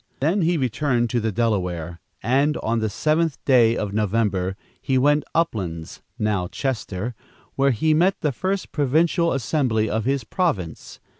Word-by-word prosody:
Then 165 +9 +1
he 170 +1 +2
returned 125 -2 0
to 120 - +1
the 110 -1 -1
Delaware, 90 -7 -1 0.2
and, 140 +7 +2
on 115 +1 0
the 110 -1 -1
seventh 155 +7 0
day 120 -4 +4
of 100 -2 -3
November, 100 -3 0 0.3
he 135 -2 +1
went 145 +3 +3
to - - -29
Uplands 95 - -2 0.2
(now 105 -4 0
Chester), 115 -3 -3 0.4
where 140 0 +2
he 155 +6 +2
met 180 +5 +2
the 150 - +1
first 190 +8 -3
provincial 165 +4 +2
assembly 120 -4 0
of 110 0 -1
his 135 -1 0
province. 110 - -3
125 Hz, 155 wpm, -23 LUFS, 105-150 Hz, 0.4 s, day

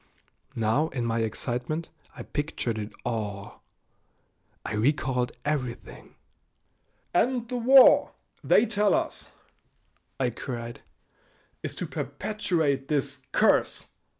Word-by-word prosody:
Now 115 +7 +2
in 125 -6 -3
my 115 0 0
excitement 125 +8 -2 0.3
I - - -7
pictured 135 -6 -3
it 105 0 -5
all. 105 -4 -4 1.0
I - - -3
recalled 125 +2 +1
everything. 135 -5 -4 1.0
"And 240 +5 +1
the 250 +1 -3
war, 260 +2 +7 0.3
they 225 - +5
tell 210 -3 +2
us," - - -2 0.9
I 125 -2 +1
cried, 120 -1 -6 0.8
"is - - -4
to - - -3
perpetuate 160 -10 -1
this 145 -3 -1
curse!" - - +3
135 Hz, 100 wpm, -27 LUFS, 115-170 Hz, 1.0 s, war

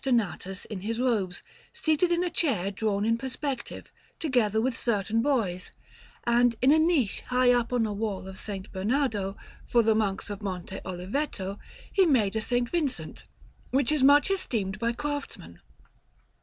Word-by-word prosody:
Donatus 195 - -1
in 200 -4 -6
his 225 +3 -3
robes, 210 -8 0 0.3
seated 315 +3 +1
in 345 +1 +2
a 355 - -1
chair 225 - 0
drawn 205 0 -1
in 230 +1 +2
perspective, 265 0 -5 0.3
together 240 -8 +1
with 245 +2 0
certain 225 -1 0
boys; 215 -10 0 0.5
and 240 0 +3
in 260 +2 +5
a 315 - +6
niche 315 - +2
high 250 0 +4
up 240 -1 +1
on 245 -2 +2
a 210 - -2
wall 200 -2 -3
of 190 - -8
S. 195 -2 -3
Bernardo, 205 -1 0 0.3
for 235 -1 +4
the 220 0 +4
Monks 210 -2 -1
of 205 - -6
Monte 190 -1 -5
Oliveto, 195 +2 -3 0.3
he 385 -3 +5
made 225 -9 +2
a - - +2
S. 215 - -5
Vincent, 250 +3 -1 0.4
which 270 +1 +2
is 305 -3 +2
much 285 +6 +6
esteemed 210 - -1
by 235 +1 +1
craftsmen. 285 - -5
230 Hz, 160 wpm, -28 LUFS, 200-270 Hz, 0.5 s, a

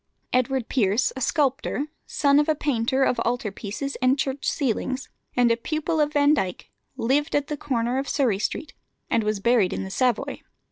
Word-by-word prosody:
Edward 255 -1 +1
Pierce, 215 -2 +1
a 265 - -6
sculptor, 280 +1 0 0.2
son 280 -1 +3
of 295 - +1
a 310 - +3
painter 265 -2 +1
of 245 - +1
altar 235 -2 -1
pieces 215 +8 -5
and 255 +2 +4
church 270 0 -1
ceilings, 260 0 -2 0.3
and 245 -1 +4
a - - +4
pupil 310 +6 -2
of 300 0 +1
Vandyke, 285 -11 +1 0.3
lived 275 +6 +1
at 290 0 0
the 300 - -1
corner 250 -3 -1
of 275 - -4
Surrey 245 -9 +1
Street, 285 +7 -3 0.4
and 230 - +2
was 210 -1 -1
buried 225 -3 +3
in - - -3
the 190 - -6
Savoy. 245 +1 0
260 Hz, 180 wpm, -24 LUFS, 230-285 Hz, 0.4 s, and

